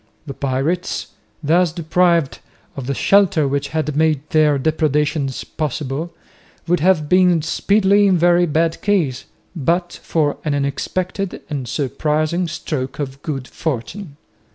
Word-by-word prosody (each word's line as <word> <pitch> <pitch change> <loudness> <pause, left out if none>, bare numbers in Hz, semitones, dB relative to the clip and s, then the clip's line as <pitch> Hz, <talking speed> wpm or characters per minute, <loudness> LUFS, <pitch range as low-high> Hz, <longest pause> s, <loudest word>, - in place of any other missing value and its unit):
The 140 - -6
pirates, 140 +7 -2 0.3
thus 170 +3 +3
deprived 170 -2 +1 0.4
of 135 -3 -6
the 140 - -1
shelter 190 -6 +3
which 140 +1 -1
had 155 -1 -2
made 155 -2 +1
their 155 -2 +4
depredations 150 -1 0
possible, 150 +1 -4 0.6
would 175 +1 +2
have 165 -2 +2
been 180 -2 +4
speedily 200 +4 +3
in 185 -2 +3
very 175 +1 +4
bad 160 +1 0
case, 165 -11 0 0.3
but 170 +3 -1
for 150 -3 0
an 150 -2 0
unexpected 180 +7 -3
and 135 -4 -3
surprising 155 +6 -1
stroke 135 -4 -4
of 140 -1 -5
good 135 -5 -4
fortune. 150 - -5
155 Hz, 130 wpm, -19 LUFS, 140-175 Hz, 0.6 s, their